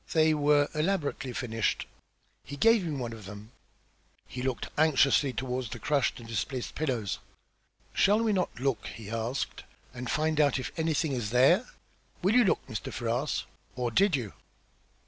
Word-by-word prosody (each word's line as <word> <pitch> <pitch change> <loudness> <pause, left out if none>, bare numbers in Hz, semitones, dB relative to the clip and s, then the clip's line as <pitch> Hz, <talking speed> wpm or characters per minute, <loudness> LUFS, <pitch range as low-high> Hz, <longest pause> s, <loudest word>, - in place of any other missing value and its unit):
They 160 -1 +4
were 145 -1 +3
elaborately 155 -5 -1
finished. 115 -3 -1 0.6
He 145 - -8
gave 225 +3 +5
me 170 - -3
one 120 -4 -4
of 110 -3 -10
them." 105 +3 -10 0.8
He 125 +3 -6
looked 130 -2 -2
anxiously 145 -2 +4
toward 125 -1 -3
the - - -6
crushed 145 -4 0
and 115 - -11
displaced 115 +4 -3
pillows. 125 - -2 0.7
"Shall 210 +3 +4
we 220 -2 +2
not 185 -10 -1
look," 135 -2 -1
he 110 -2 -8
asked, 115 +4 -3 0.3
"and 125 -1 -6
find 155 0 +1
out 145 -2 +3
if 130 - -4
anything 160 -1 0
is 120 -6 -2
there? 135 - +4 0.6
Will 195 +4 +3
you 245 0 +6
look, 195 - +1
Mr. 110 -5 -5
Ferrars? 120 +5 -1 0.3
Or 125 -2 -1
did 195 - +4
you?" 115 -7 -4
135 Hz, 160 wpm, -29 LUFS, 120-155 Hz, 0.8 s, you